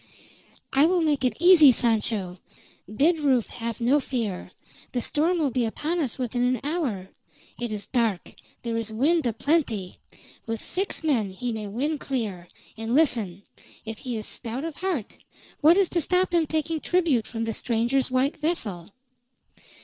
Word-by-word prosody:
"I 280 Hz, +4 st, +5 dB
will 360 Hz, 0 st, +2 dB
make 295 Hz, -4 st, +1 dB
it 250 Hz, -, +1 dB
easy, 340 Hz, -5 st, +8 dB
Sancho. 215 Hz, -6 st, 0 dB, 0.5 s
Bid 315 Hz, +9 st, +2 dB
Rufe 265 Hz, -6 st, +2 dB
have 230 Hz, 0 st, -5 dB
no 250 Hz, +5 st, +3 dB
fear. 230 Hz, -9 st, -3 dB, 0.4 s
The 245 Hz, -, 0 dB
storm 330 Hz, +4 st, +1 dB
will 300 Hz, -5 st, +1 dB
be 250 Hz, 0 st, 0 dB
upon 305 Hz, +10 st, -1 dB
us 270 Hz, -8 st, -2 dB
within 245 Hz, -1 st, -2 dB
an 250 Hz, 0 st, +2 dB
hour. 275 Hz, -, -2 dB, 0.5 s
It 240 Hz, -2 st, -3 dB
is 210 Hz, -1 st, -4 dB
dark; 225 Hz, -7 st, -1 dB, 0.3 s
there 230 Hz, -1 st, -2 dB
is 225 Hz, -1 st, -3 dB
wind 295 Hz, +6 st, +2 dB
aplenty. 230 Hz, -, -1 dB, 0.5 s
With 225 Hz, 0 st, -2 dB
six 380 Hz, -, -3 dB
men 245 Hz, -10 st, +1 dB
he 235 Hz, +6 st, -4 dB
may 215 Hz, -2 st, -4 dB
win 280 Hz, +9 st, -2 dB
clear; 210 Hz, -11 st, -4 dB, 0.3 s
and 225 Hz, +2 st, -2 dB
listen: 225 Hz, -, +2 dB, 0.4 s
If 220 Hz, -1 st, -6 dB
he 245 Hz, -3 st, -4 dB
is 215 Hz, -, -6 dB
stout 240 Hz, +3 st, -5 dB
of 325 Hz, -2 st, -5 dB
heart, 355 Hz, -, -3 dB, 0.4 s
what 320 Hz, +4 st, +6 dB
is 395 Hz, -2 st, +4 dB
to 345 Hz, -, 0 dB
stop 365 Hz, +3 st, +1 dB
him 330 Hz, -2 st, +3 dB
taking 315 Hz, +1 st, -1 dB
tribute 315 Hz, -10 st, +1 dB
from 225 Hz, 0 st, -4 dB
the 225 Hz, 0 st, -2 dB
stranger's 240 Hz, +4 st, 0 dB
white 260 Hz, +3 st, +1 dB
vessel?" 220 Hz, -, -2 dB
250 Hz, 165 wpm, -25 LUFS, 225-310 Hz, 0.5 s, easy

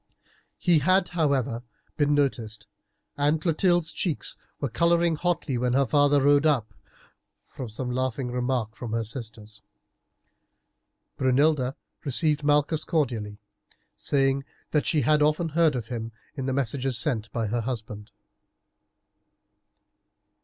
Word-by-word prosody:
He 175 Hz, -3 st, +3 dB
had, 185 Hz, +5 st, +3 dB
however, 140 Hz, -8 st, 0 dB, 0.3 s
been 145 Hz, -1 st, +2 dB
noticed, 115 Hz, -7 st, -1 dB, 0.5 s
and 145 Hz, +2 st, +2 dB
Clotilde's 175 Hz, 0 st, +1 dB
cheeks 170 Hz, -6 st, -2 dB, 0.2 s
were 140 Hz, -, -1 dB
colouring 170 Hz, +6 st, +2 dB
hotly 155 Hz, -6 st, -1 dB
when 125 Hz, 0 st, 0 dB
her 140 Hz, +1 st, +3 dB
father 145 Hz, +3 st, +4 dB
rode 145 Hz, +2 st, +5 dB
up, 125 Hz, -8 st, +1 dB, 0.7 s
from 130 Hz, -4 st, -8 dB
some 125 Hz, +3 st, -4 dB
laughing 130 Hz, 0 st, -2 dB
remark 125 Hz, -3 st, -1 dB
from 115 Hz, -3 st, -6 dB
her 115 Hz, 0 st, 0 dB
sisters. 110 Hz, -2 st, -6 dB, 1.6 s
Brunilda 130 Hz, 0 st, +2 dB, 0.3 s
received 150 Hz, +1 st, +1 dB
Malchus 150 Hz, +2 st, +2 dB
cordially, 115 Hz, -10 st, -1 dB, 0.6 s
saying 135 Hz, -1 st, +1 dB, 0.3 s
that 150 Hz, -, +1 dB
she 155 Hz, -, +3 dB
had 150 Hz, 0 st, +3 dB
often 155 Hz, +3 st, +2 dB
heard 160 Hz, -2 st, +3 dB
of 120 Hz, -2 st, -4 dB
him 115 Hz, -2 st, -4 dB, 0.2 s
in 135 Hz, -2 st, -4 dB
the -, -, 0 dB
messages 135 Hz, -1 st, -1 dB
sent 115 Hz, -8 st, 0 dB
by 115 Hz, -1 st, -1 dB
her 115 Hz, +3 st, -1 dB
husband. 110 Hz, -3 st, -5 dB
135 Hz, 125 wpm, -26 LUFS, 120-150 Hz, 1.6 s, rode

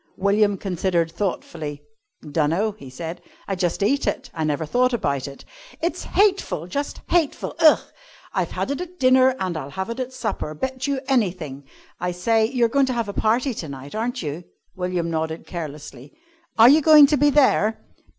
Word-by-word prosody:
William 200 Hz, +1 st, +2 dB
considered 175 Hz, -3 st, -1 dB
thoughtfully. 160 Hz, -5 st, -4 dB, 0.4 s
"Dunno," 165 Hz, +8 st, +1 dB
he 200 Hz, -10 st, -12 dB
said. 165 Hz, +6 st, -7 dB, 0.3 s
"I 195 Hz, -, -1 dB
just 180 Hz, +1 st, -1 dB
eat 275 Hz, +7 st, +1 dB
it; 265 Hz, -, -2 dB
I 160 Hz, -, -3 dB
never 155 Hz, +1 st, -1 dB
thought 250 Hz, +10 st, +1 dB
about 140 Hz, -, -1 dB
it." 140 Hz, 0 st, -11 dB, 0.3 s
"It's 340 Hz, -, -2 dB
hateful, 390 Hz, -, +1 dB
just 280 Hz, +11 st, -4 dB
hateful. 340 Hz, -4 st, 0 dB
Ugh! 310 Hz, -2 st, +7 dB, 0.6 s
I've -, -, 0 dB
had -, -, -3 dB
it 285 Hz, -, -3 dB
at 360 Hz, 0 st, -8 dB
dinner 255 Hz, 0 st, +5 dB
and 185 Hz, -2 st, -2 dB
I'll 140 Hz, -3 st, -5 dB
have 190 Hz, +9 st, -4 dB
it 230 Hz, -, -6 dB
at 255 Hz, 0 st, -3 dB
supper 220 Hz, -11 st, -4 dB
bet 260 Hz, -, -3 dB
you 275 Hz, -2 st, -1 dB
anything. 175 Hz, -, -1 dB, 0.3 s
I 180 Hz, 0 st, -2 dB
say, 220 Hz, +5 st, +2 dB
you 245 Hz, -1 st, +1 dB
are -, -, +4 dB
going 275 Hz, +3 st, +2 dB
to 255 Hz, -, -1 dB
have 230 Hz, -3 st, -1 dB
a -, -, -4 dB
party 240 Hz, +6 st, +1 dB
to 160 Hz, -8 st, -6 dB
night, 135 Hz, +1 st, -9 dB
aren't 230 Hz, -1 st, -2 dB
you?" 155 Hz, +3 st, -5 dB, 0.3 s
William 180 Hz, -2 st, -2 dB
nodded 160 Hz, 0 st, -3 dB
carelessly. 145 Hz, -5 st, -8 dB, 0.4 s
"Are 225 Hz, +1 st, +8 dB
you 295 Hz, +5 st, +7 dB
going 305 Hz, -1 st, +8 dB
to 295 Hz, +2 st, +2 dB
be 290 Hz, +2 st, +4 dB
there?" 260 Hz, -6 st, +3 dB
200 Hz, 185 wpm, -23 LUFS, 160-255 Hz, 0.6 s, Are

